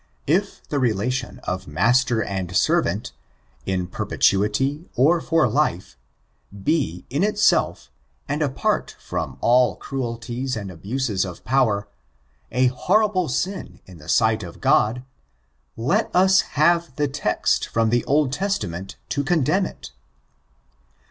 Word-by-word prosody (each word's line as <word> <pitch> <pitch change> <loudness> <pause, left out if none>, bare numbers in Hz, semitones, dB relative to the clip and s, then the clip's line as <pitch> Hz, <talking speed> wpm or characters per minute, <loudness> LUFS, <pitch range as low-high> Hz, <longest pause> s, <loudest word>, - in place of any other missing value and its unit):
If 190 +7 -1
the 145 - -1
relation 125 +2 -1
of 95 0 -4
master 115 - +2
and 95 -2 -2
servant, - - +1 0.6
in 95 -1 0
perpetuity 110 - 0
or 160 +7 +4
for 165 -1 +2
life» 105 - -1 0.7
be, 140 - 0
in 145 +7 +1
itself, 210 - +1 0.4
and 145 +2 -2
apart 140 -3 -1
from 80 -7 -4
all 125 +1 +4
cruelties 120 0 -4
and 100 -3 -6
abuse* 105 +4 -2
of 90 -3 -8
power, 110 -6 +1 0.6
a 125 +2 +2
horrible 185 - +2
sin 150 - -3
in 90 -3 -14
the 75 +2 -12
sight 110 -2 +3
of 85 -4 -9
Qod, 125 +4 +2 0.7
let 170 - +1
us 190 +1 +5 0.2
have 170 -2 +3
the 145 0 +1
text 140 +2 0
from 115 -1 +1
the 120 0 +2
Old 145 -2 +2
Testament 105 - -3
to 140 - -1
condemn 175 +5 +1
it. - - -11
125 Hz, 125 wpm, -22 LUFS, 100-150 Hz, 0.7 s, us